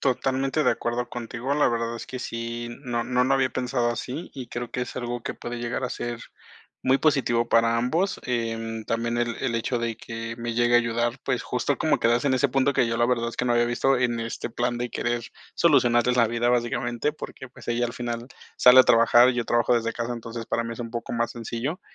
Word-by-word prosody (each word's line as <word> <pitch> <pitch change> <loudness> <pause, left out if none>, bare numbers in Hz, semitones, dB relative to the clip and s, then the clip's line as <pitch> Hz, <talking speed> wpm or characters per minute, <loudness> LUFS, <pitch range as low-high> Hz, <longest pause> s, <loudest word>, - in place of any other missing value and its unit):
Totalmente 135 +2 0
de - - +5
acuerdo 120 +1 -2
contigo, 120 +3 -4
la 150 - +3
verdad 115 0 -2
es - - -8
que 130 - -6
sí, 115 0 -4
no 120 -2 -2
no 125 +1 +2
lo 135 - +1
había 130 -1 +2
pensado 125 -1 -1
así, 130 +7 -5
y 130 -3 -7
creo 120 0 -5
que 125 - -2
es 125 - -6
algo 120 -1 -3
que - - -3
puede 120 0 -6
llegar 120 +2 -3
a 125 - -1
ser 120 -1 -4 0.6
muy 130 +1 +3
positivo 120 -6 +2
para 115 0 +3
ambos, 165 +12 0
em, 115 -2 -3
también 115 +1 -1
el 120 -1 0
el 125 -3 -1
hecho 120 +2 -1
de 115 -2 -2
que 115 0 -6
me 120 0 -4
llegue 120 +1 +2
a - - +8
ayudar, 120 +1 -1
pues, 125 - 0
justo 125 +2 -1
como 155 -2 +2
quedarse 120 +3 +2
en 130 - +3
ese 140 +2 +2
punto 135 +1 +1
que 120 - +3
yo 115 0 -1
la 120 - +3
verdad, 120 -1 0
es - - -11
que 125 - 0
no 120 - +2
había 120 0 +4
visto, 125 +3 +2
en 120 -2 0
este 115 +1 -4
plan 120 +1 -1
de 120 0 -3
querer 120 0 -1 0.3
solucionarles 125 -6 +3
la 115 - +5
vida, 120 +1 +1
básicamente, 120 +3 0
porque, 130 -3 -9
pues, - - -15
ella 120 0 +1
al 120 - -7
final 120 0 -4 0.3
sale 125 +1 +9
a - - +8
trabajar 120 +2 +6
y - - -3
yo 120 -1 -2
trabajo 120 +1 +3
desde 115 -1 0
casa, 120 +1 -3
entonces, 115 0 -6
para 115 - -1
mí 115 0 -5
es 120 - -9
un 115 - -5
poco 115 0 -4
más 115 0 0
sencillo, 120 - -4
120 Hz, 235 wpm, -25 LUFS, 115-125 Hz, 0.6 s, sale